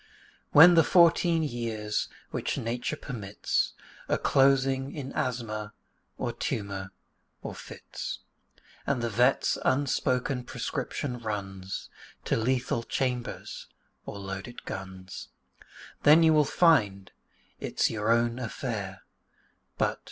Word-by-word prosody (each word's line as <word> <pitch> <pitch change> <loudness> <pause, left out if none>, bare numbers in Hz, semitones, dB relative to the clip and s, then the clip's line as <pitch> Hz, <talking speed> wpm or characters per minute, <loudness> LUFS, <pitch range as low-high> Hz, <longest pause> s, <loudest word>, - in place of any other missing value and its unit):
When 165 +4 +9
the 165 -1 +6
fourteen 170 -1 +4
years 115 -6 -2 0.2
which - - -2
Nature 120 +5 -2
permits 105 -9 -2 0.4
Are - - +2
closing 135 0 +2
in 135 -3 -5
asthma, 110 -4 -3 0.4
or 120 - -2
tumour, 100 -6 -3 0.5
or - - -5
fits, - - -7 0.7
And 130 -4 0
the 120 - -1
vet's 125 +5 +2
unspoken 130 -1 +1
prescription 125 +1 -4
runs 100 -4 -5 0.4
To - - +1
lethal 125 +1 0
chambers 125 0 -3 0.4
or - - -6
loaded 95 +4 -7
guns, 95 -1 -7 0.7
Then 155 +3 +7
you 160 -1 +6
will 150 -1 +5
find 105 - +3 0.5
it's - - 0
your 110 0 -2
own 115 +1 +2
affair 110 -5 -4 0.7
But... - - 0
120 Hz, 105 wpm, -28 LUFS, 105-135 Hz, 0.7 s, When